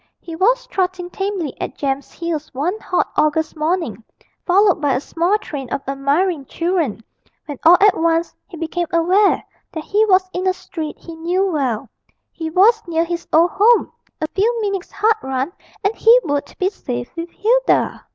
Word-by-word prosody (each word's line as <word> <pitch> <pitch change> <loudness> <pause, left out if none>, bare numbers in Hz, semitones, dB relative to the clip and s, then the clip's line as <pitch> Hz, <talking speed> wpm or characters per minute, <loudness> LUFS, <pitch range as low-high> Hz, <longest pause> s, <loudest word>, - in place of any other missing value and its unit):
He 330 - -8
was - - +2
trotting 370 -6 -2
tamely 385 -8 -3
at - - -5
Jem's 275 -1 -2
heels 330 -3 -4
one 350 +10 -1
hot 365 - -1
August 305 +1 +1
morning, 310 - -2 0.4
followed 385 -1 +4
by 285 -2 +2
a - - +1
small 340 +8 0
train 280 - -7
of 275 +1 -3
admiring 280 +4 0
children, 335 - -1 0.4
when 290 -3 -7
all 340 +2 +8
at 405 -1 +5
once 330 +1 0
he 365 -4 -11
became 335 +2 -2
aware 370 +5 +3 0.3
that 320 -4 -5
he 420 +5 +2
was 375 -1 +4
in 370 +1 -2
a 370 - +3
street 315 -4 -7
he 335 - -10
knew 350 +4 0
well 270 - -1 0.4
he 320 -1 -5
was 425 +7 +4
near 330 -1 +1
his 340 0 -4
old 335 +2 +4
home 450 +3 +4 0.3
a - - -1
few 460 +5 +1
minutes' 395 -3 -3
hard 435 +2 +3
run 265 +5 -3 0.3
and 400 +3 +1
he 465 +2 +6
would 285 -2 -2
be 375 - +1
safe 245 - -6
with 335 +1 -5
Hilda! 485 +7 +1
340 Hz, 175 wpm, -19 LUFS, 305-390 Hz, 0.4 s, all